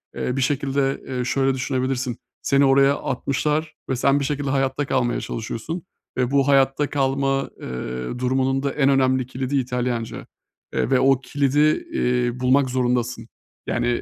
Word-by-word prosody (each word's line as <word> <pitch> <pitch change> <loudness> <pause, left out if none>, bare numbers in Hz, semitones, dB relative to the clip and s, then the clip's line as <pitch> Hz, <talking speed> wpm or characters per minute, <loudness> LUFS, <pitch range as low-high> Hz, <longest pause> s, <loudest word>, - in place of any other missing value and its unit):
eee, 125 - -2
bir - - +1
şekilde, 135 0 0
eee, 125 -2 -2
şöyle 135 +1 +1
düşünebilirsin: 130 -1 -2 0.2
Seni 140 0 +3
oraya 135 +1 +5
atmışlar 150 +4 -1
ve 130 - +1
sen 140 +3 +3
bir 140 - -1
şekilde 145 0 -2
hayatta 135 +1 0
kalmaya 120 -3 0
çalışıyorsun 115 +9 -5 0.3
ve 125 0 +1
bu 140 -1 +3
hayatta 140 +1 +3
kalma, 135 0 0
eee, - - -7 0.5
durumunun 130 +1 +1
da 140 - 0
en 140 -2 +2
önemli 130 -1 +3
kilidi 130 +2 -2
İtalyanca. 125 -2 -2 0.5
Eee, - - 0
ve 130 -2 +4
o 135 0 +3
kilidi, 145 - +1
iii, 125 0 0
bulmak 130 +1 +3
zorundasın. 120 -2 -1 0.4
Yani, 120 0 0
135 Hz, 150 wpm, -22 LUFS, 125-140 Hz, 0.5 s, oraya